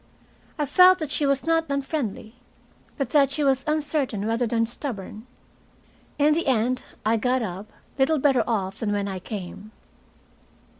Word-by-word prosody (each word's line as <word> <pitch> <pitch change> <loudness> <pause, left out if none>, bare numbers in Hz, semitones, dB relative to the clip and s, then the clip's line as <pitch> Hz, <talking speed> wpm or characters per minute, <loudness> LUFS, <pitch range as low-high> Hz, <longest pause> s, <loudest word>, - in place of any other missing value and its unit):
I 300 - 0
felt 365 +5 +6
that 310 -5 -5
she 290 - 0
was 275 0 0
not 325 0 +2
unfriendly, 270 -6 -3 0.6
and 275 - -1
that 280 -1 +4
she 290 +2 -1
was 265 -1 +2
uncertain 295 -8 -1
rather 230 +2 0
than 230 0 +1
stubborn. 225 -2 -6 0.9
In 300 +1 +4
the 335 0 -1
end 255 0 +1 0.2
I 225 +1 +3
got 250 +2 0
up, 195 +1 -6 0.3
little 310 +4 +3
better 265 -4 +3
off 195 -4 -2
than 210 -2 -1
when 200 -1 -1
I 190 -1 -4
came. 205 +1 -8
255 Hz, 155 wpm, -24 LUFS, 215-290 Hz, 0.9 s, felt